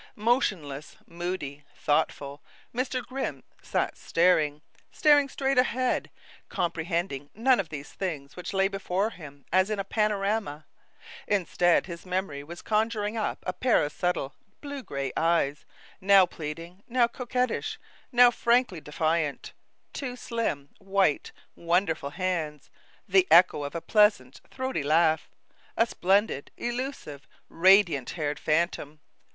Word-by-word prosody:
Motionless, 195 Hz, -, -1 dB
moody, 170 Hz, -5 st, -5 dB
thoughtful, 145 Hz, -1 st, -1 dB, 0.3 s
Mr. 255 Hz, +1 st, -2 dB
Grimm 265 Hz, +1 st, -4 dB, 0.2 s
sat -, -, -1 dB
staring, 155 Hz, -4 st, +2 dB, 0.3 s
staring 290 Hz, -2 st, +4 dB
straight 270 Hz, -1 st, +1 dB
ahead, 255 Hz, 0 st, 0 dB, 0.4 s
comprehending 165 Hz, -4 st, -2 dB
none 245 Hz, +3 st, +3 dB
of 180 Hz, -5 st, -2 dB
these 145 Hz, -2 st, -8 dB
things 150 Hz, -7 st, -5 dB
which 180 Hz, -, -6 dB
lay 195 Hz, 0 st, +2 dB
before 195 Hz, +1 st, -1 dB
him 145 Hz, -7 st, -12 dB
as 185 Hz, +2 st, +4 dB
in 215 Hz, -, -1 dB
a 195 Hz, -, -2 dB
panorama. 205 Hz, -6 st, -1 dB, 0.6 s
Instead, 175 Hz, -3 st, +2 dB
his 170 Hz, -2 st, -8 dB
memory 180 Hz, -6 st, -3 dB
was 170 Hz, +3 st, -10 dB
conjuring 215 Hz, 0 st, 0 dB
up 220 Hz, -, -3 dB
a 185 Hz, -, -2 dB
pair 245 Hz, -10 st, +2 dB
of 145 Hz, -, -5 dB
subtle, 170 Hz, -5 st, -2 dB, 0.3 s
blue 285 Hz, -1 st, -6 dB
gray 140 Hz, -, -4 dB
eyes, 165 Hz, -4 st, +1 dB, 0.3 s
now 195 Hz, 0 st, +6 dB
pleading, 165 Hz, +3 st, -8 dB
now 245 Hz, 0 st, +3 dB
coquettish, 250 Hz, +1 st, -2 dB, 0.3 s
now 245 Hz, -1 st, +7 dB
frankly 235 Hz, -7 st, +1 dB
defiant; 155 Hz, 0 st, -1 dB, 0.4 s
two 255 Hz, -3 st, -4 dB
slim, 230 Hz, -, -3 dB
white, 195 Hz, -6 st, +1 dB, 0.2 s
wonderful 170 Hz, -4 st, 0 dB
hands; 160 Hz, -4 st, -3 dB, 0.4 s
the 190 Hz, -1 st, +4 dB
echo 170 Hz, -1 st, +6 dB
of 145 Hz, +3 st, -5 dB
a 170 Hz, -, -3 dB
pleasant, 205 Hz, -, +2 dB
throaty 260 Hz, -, -3 dB
laugh; 155 Hz, +2 st, +2 dB, 0.5 s
a 230 Hz, -, +5 dB
splendid, 195 Hz, -, +1 dB
elusive, 240 Hz, -, -5 dB, 0.2 s
radiant 175 Hz, -6 st, +4 dB
haired 150 Hz, -2 st, -2 dB
phantom. 155 Hz, -2 st, -1 dB
180 Hz, 125 wpm, -27 LUFS, 150-220 Hz, 0.6 s, now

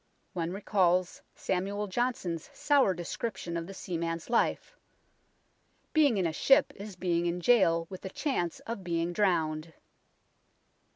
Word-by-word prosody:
One 170 Hz, -1 st, -2 dB
recalls 185 Hz, -2 st, +1 dB
Samuel 200 Hz, +3 st, -2 dB
Johnson's 190 Hz, -6 st, -2 dB
sour 275 Hz, -10 st, +3 dB
description 175 Hz, +1 st, -4 dB
of 170 Hz, +1 st, -4 dB
a -, -, -7 dB
seaman's 170 Hz, +1 st, -4 dB
life 235 Hz, -, +1 dB, 0.6 s
" -, -, -42 dB
being 290 Hz, -8 st, +4 dB
in 185 Hz, -, +1 dB
a 165 Hz, -, 0 dB
ship 270 Hz, -, +4 dB
is 200 Hz, 0 st, -8 dB
being 175 Hz, -1 st, 0 dB
in 170 Hz, +1 st, -1 dB
jail 170 Hz, -6 st, +4 dB
with 185 Hz, +1 st, -9 dB
the 190 Hz, -, -6 dB
chance 185 Hz, -, -2 dB
of 225 Hz, -4 st, -6 dB
being 170 Hz, 0 st, -1 dB
drowned." 160 Hz, -5 st, 0 dB
180 Hz, 135 wpm, -30 LUFS, 170-210 Hz, 0.6 s, being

